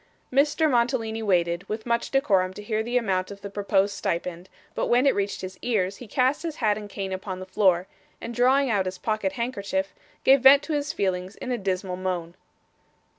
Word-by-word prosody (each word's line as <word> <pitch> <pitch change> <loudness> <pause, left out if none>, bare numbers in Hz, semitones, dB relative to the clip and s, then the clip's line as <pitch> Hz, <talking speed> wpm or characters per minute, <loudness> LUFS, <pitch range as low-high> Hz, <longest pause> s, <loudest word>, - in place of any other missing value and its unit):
Mr. 300 +3 +3
Mantalini 235 -4 0
waited, 175 -4 +1
with 215 +1 -4
much 235 0 0
decorum, 195 -9 +2
to 210 - -8
hear 215 +1 -1
the 240 +2 0
amount 190 -6 0
of 200 0 -10
the 200 - -7
proposed 200 0 +1
stipend, 175 0 -3 0.2
but - - -1
when 245 +3 +3
it 275 - +5
reached 200 0 -2
his 185 0 -7
ears, 200 -5 0
he 245 - -10
cast 255 +6 +1
his 325 -2 -4
hat 215 -6 +1
and 205 -1 -8
cane 195 -1 -4
upon 185 0 -5
the 185 - -7
floor, 185 -2 +2 0.3
and 235 - -6
drawing 260 +4 +3
out 200 -5 +1
his 185 0 -4
pocket 215 +8 -1
handkerchief, 200 -6 -2 0.3
gave 270 0 +6
vent 275 +2 +8
to 320 - -3
his 290 0 -1
feelings 185 0 -2
in 255 - -6
a 245 - 0
dismal 185 -1 -2
moan. 180 -2 -3
205 Hz, 200 wpm, -25 LUFS, 185-245 Hz, 0.3 s, vent